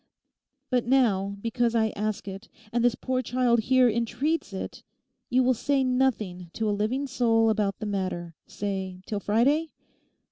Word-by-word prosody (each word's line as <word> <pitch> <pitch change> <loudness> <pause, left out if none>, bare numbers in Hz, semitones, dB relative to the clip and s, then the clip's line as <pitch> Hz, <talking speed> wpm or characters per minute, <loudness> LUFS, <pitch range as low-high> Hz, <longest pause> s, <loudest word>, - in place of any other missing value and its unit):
But 250 -2 +1
now, 200 -7 +2
because 235 0 0
I 220 -1 +3
ask 210 -1 -3
it, 195 +3 -8 0.2
and 240 0 +1
this 240 -1 +3
poor 255 +1 -1
child 245 -2 +2
here 255 +3 +4
entreats 235 +7 -1
it, 190 - -6 0.5
you 255 +1 +3
will 255 +1 +4
say 275 +3 +1
nothing 225 -9 0
to 225 - -1
a - - +2
living 220 +7 -1
soul 230 -4 +2
about 205 -2 0
the 215 - -5
matter, 185 -4 -3
say, 190 -2 -4
till 210 - -3
Friday? 275 +11 +2
230 Hz, 155 wpm, -27 LUFS, 205-255 Hz, 0.5 s, here